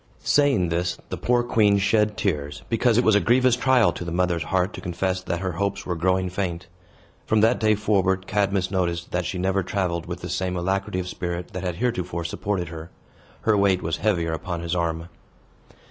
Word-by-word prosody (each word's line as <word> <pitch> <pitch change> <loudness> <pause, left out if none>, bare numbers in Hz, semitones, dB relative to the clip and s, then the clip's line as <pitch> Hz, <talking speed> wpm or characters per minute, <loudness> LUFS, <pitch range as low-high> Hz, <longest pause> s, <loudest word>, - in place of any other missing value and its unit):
Saying 135 - +3
this, 85 +1 -1
the - - -3
poor 120 0 +1
queen 105 -4 +3
shed 105 +2 +2
tears, 75 -9 -2
because 115 0 +2
it 125 - +4
was 110 - +4
a 105 - +5
grievous 125 +2 +3
trial 125 -2 +4
to - - -6
the 85 - -5
mother's 85 -1 +1
heart 95 +2 0
to - - -7
confess 95 +1 -2
that 85 -1 -3
her 95 -1 -1
hopes 100 +3 -2
were 90 - -2
growing 95 +2 +1
faint. 90 -2 -3 0.6
From 110 -1 +3
that 115 +3 +3
day 110 -1 +3
forward, 95 -2 +1
Cadmus 100 -2 0
noticed 85 -2 -1
that 90 -1 -1
she 95 - -3
never 95 +2 +1
traveled 90 -2 -2
with 90 0 -6
the - - -5
same 90 -1 -2
alacrity 95 +2 -1
of 90 - -4
spirit 90 -1 -4
that 90 - -4
had 90 -3 -3
heretofore 90 -6 -2
supported 90 0 -2
her. 80 0 -8 0.5
Her 110 - +3
weight 100 -2 +2
was 80 0 -1
heavier 85 -6 0
upon 85 +1 -4
his 85 0 -3
arm. 85 -1 -1
95 Hz, 200 wpm, -24 LUFS, 85-105 Hz, 0.6 s, a